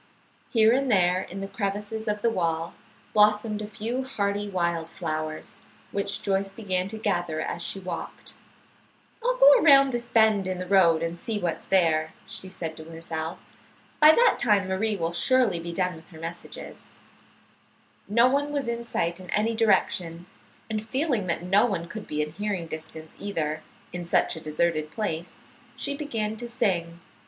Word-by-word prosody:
Here 225 -1 +5
and 270 +1 +1
there 180 -2 +3
in 195 +2 -7
the 195 - -4
crevices 205 +2 -4
of 210 0 -1
the 235 - +4
wall 165 -4 -1 0.4
blossomed 210 0 +3
a 210 - -5
few 225 +5 -3
hardy 205 -5 -2
wild 170 -3 -1
flowers, 155 -3 -5 0.3
which 200 0 -1
Joyce 195 -1 0
began 190 -3 -2
to 220 +2 -6
gather 175 -7 -1
as 170 +2 -3
she 195 - -1
walked. 185 -1 -7 0.9
"I'll - - +1
go - - +8
around 275 -6 +6
this 240 0 -3
bend 220 -4 +3
in 185 -1 -2
the 185 - -4
road 175 -4 +4
and 165 +1 -3
see 220 +3 -2
what's 175 -5 -3
there," 160 -4 +2
she 190 - -2
said 165 -3 -5
to 160 - -8
herself. 165 0 -5 0.5
"By 305 0 +9
that 480 +5 +4
time 205 -5 +3
Marie 205 +3 0
will 165 -2 -2
surely 230 -1 +3
be 170 +1 -5
done 180 +1 0
with 160 - -16
her 160 -4 -13
messages." 170 +1 -8 1.2
No 235 +4 +4
one 285 +2 +1
was 285 -4 -2
in 235 0 -2
sight 170 -6 -1
in 185 -1 -11
any 220 +2 +1
direction, 180 -6 +1 0.4
and 215 -1 -3
feeling 250 - -1
that 170 0 -1
no 195 +6 +4
one 175 -6 -3
could 215 +4 -8
be 150 0 -1
in 150 - -6
hearing 195 0 -3
distance, 160 0 -8
either, 155 -6 -2 0.3
in 180 0 -4
such 170 - +2
a 160 - -8
deserted 155 0 0
place, 175 -4 -4 0.3
she 280 0 -2
began 225 -7 -3
to 240 +1 -7
sing. 170 -7 -1
195 Hz, 170 wpm, -26 LUFS, 170-220 Hz, 1.2 s, By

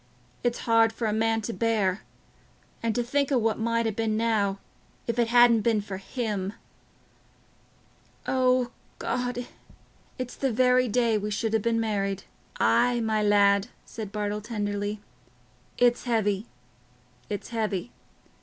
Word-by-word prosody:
it's 240 -1 0
hard 230 -1 +4
for 225 +1 -4
a 215 - +1
man 225 +1 +1
to 230 +2 -4
bear... 215 -5 +1 0.8
and 230 -1 -1
to 245 - +1
think 280 +3 0
o' 270 - +4
what 225 -2 +1
might 230 +1 +1
ha' 220 -2 -1
been 220 -1 0
now, 215 -4 +1 0.5
if 235 0 -2
it 235 - +3
hadn't 240 -1 +6
been 225 0 +2
for 200 -2 -5
him.... 205 -2 -3 1.7
O 255 -1 +2 0.3
God, 245 0 -2 0.7
it's 255 -2 -5
the 270 -2 0
very 250 +2 +3
day 230 -1 +2
we 210 +1 -3
should 220 +1 -1
ha' 220 - +2
been 230 +1 +1
married." 200 -3 -1 0.4
"Aye, 235 - +3
my 220 -1 +1
lad," 200 0 +4 0.2
said 215 -3 -7
Bartle 210 0 -2
tenderly, 205 -1 -3 0.8
"it's 245 0 +3
heavy—it's 125 - -4
heavy. 220 -2 -2
225 Hz, 135 wpm, -27 LUFS, 205-235 Hz, 1.7 s, hadn't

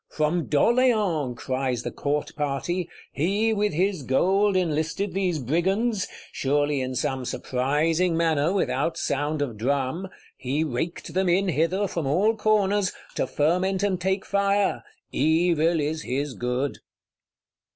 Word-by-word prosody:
From 155 +2 0
D'Orléans! 195 - +2
cries 130 -2 -2
the - - -4
Court 145 +1 -2
party: 150 +4 -2 0.2
he, 205 +9 +1
with 210 0 +1
his 185 +2 0
gold, 190 +10 +2
enlisted 165 +3 -1
these 185 -3 0
Brigands,—surely 150 - 0
in 130 0 -3
some 130 +1 -1
surprising 155 +8 0
manner, 160 -1 +2
without 190 -3 0
sound 145 +1 -1
of 120 -6 -5
drum: 135 - -1 0.3
he 135 +5 -1
raked 160 +4 -4
them 190 0 +1
in 190 +2 +2
hither, 175 +5 +1
from 165 -5 -3
all 200 +11 +2
corners; 205 -3 +2 0.2
to - - -1
ferment 185 +6 +1
and 190 -3 0
take 190 +1 0
fire; 200 0 +1 0.3
evil 165 +2 +2
is 155 +1 -1
his 140 +1 -2
good. 125 +3 -2
165 Hz, 130 wpm, -25 LUFS, 145-190 Hz, 0.3 s, D'Orléans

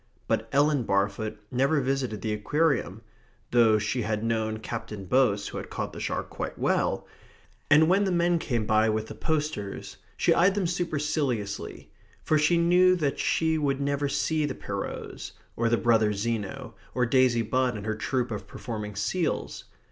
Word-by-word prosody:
But 110 +1 -1
Ellen 145 0 +3
Barfoot 100 0 -1
never 135 +4 +2
visited 130 -6 -2
the 110 - -1
Aquarium 115 - 0 0.5
(though 115 -3 +5
she 105 +4 -1
had 110 -1 -2
known 110 -1 -1
Captain 110 -3 -6
Boase 105 -2 +2
who - - -7
had - - -8
caught - - -4
the - - -7
shark - - -3
quite - - -5
well), - - 0 0.6
and 155 +2 +6
when 195 +3 +3
the 190 - 0
men 175 -1 +2
came 120 -8 -1
by 110 +1 +3
with 110 0 -1
the - - -6
posters 150 -11 -3 0.2
she - - +3
eyed 185 +3 +4
them 200 -3 0
superciliously, 150 - -2 0.3
for 155 - +2
she 150 +3 +3
knew 180 +2 +5
that 150 -6 -1
she 160 -1 +1
would 140 -2 0
never 140 0 0
see 155 +2 0
the 145 -3 -2
Pierrots, - - -6 0.2
or 115 0 +1
the 115 - +3
brothers 110 -3 +2
Zeno, 105 -2 -3 0.2
or 125 - +2
Daisy 125 -1 +3
Budd 125 +1 0
and 105 - -7
her 110 - 0
troupe 125 +2 -2
of 105 - -5
performing 105 -4 -6
seals. 115 - -2
125 Hz, 170 wpm, -27 LUFS, 110-150 Hz, 0.6 s, and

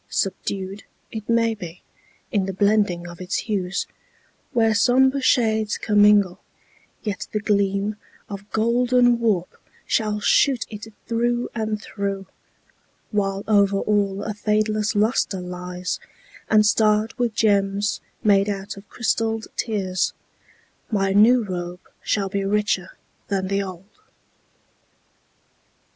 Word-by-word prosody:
Subdued, 195 +1 -3 0.3
It 220 -1 -7
may 230 -1 +3
be, 180 -5 -9 0.5
in 200 -4 +1
the 195 - -3
blending 200 -3 +1
of 175 +1 -10
its 180 +1 -3
hues, 195 -4 -1 0.7
Where 225 -2 +3
somber 260 +6 +3
shades 220 -4 +2
commingle, 205 -3 +4 0.6
yet 205 -3 -3
the 210 - 0
gleam 200 0 0 0.3
Of 200 0 -8
golden 245 +1 +3
warp 205 -7 0 0.3
shall 210 -2 0
shoot 255 +3 +3
it 220 +1 -8
through 240 +1 0
and 220 -2 -2
through, 200 -2 -4 0.9
While 195 -2 -1
over 200 -2 +4
all 200 -1 0
a 215 - -3
fadeless 215 +1 0
luster 210 -2 +1
lies, 180 0 -5 0.5
And 215 -1 +5
starred 215 +1 +3
with 235 -3 0
gems 200 -2 +1 0.2
made 200 -1 +4
out 200 0 -4
of 200 +1 -13
crystalled 225 -1 -1
tears, 195 -5 -1 0.8
My 195 -4 +1
new 230 +4 +6
robe 180 -2 -5 0.2
shall 200 -2 0
be 200 0 -2
richer 200 -2 0 0.3
than 190 -1 -1
the 200 0 +1
old. 185 -1 -7
205 Hz, 120 wpm, -23 LUFS, 195-220 Hz, 0.9 s, new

